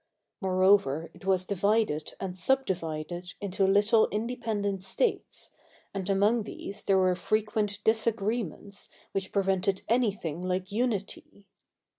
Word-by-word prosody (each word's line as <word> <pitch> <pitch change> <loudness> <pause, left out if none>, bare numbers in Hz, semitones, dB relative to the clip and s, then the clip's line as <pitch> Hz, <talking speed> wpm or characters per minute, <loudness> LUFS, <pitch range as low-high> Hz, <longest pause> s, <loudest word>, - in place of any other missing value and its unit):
Moreover, 185 -5 +3
it - - -15
was 190 -1 +2
divided 200 -5 0
and 190 -2 -4
subdivided 180 -7 -1
into 195 -1 0
little 205 +3 +4
independent 210 -3 -2
states, 195 - -1 0.4
and 195 -1 -3
among 205 +4 +3
these 205 0 -6
there 195 - +4
were 185 -1 +4
frequent 210 +2 0
disagreements 220 -3 0 0.2
which 195 -1 -3
pre 200 - +2
vented 190 0 0
anything 205 -9 0
like 185 +1 -2
unity. 205 -3 -2
195 Hz, 115 wpm, -29 LUFS, 185-215 Hz, 0.4 s, little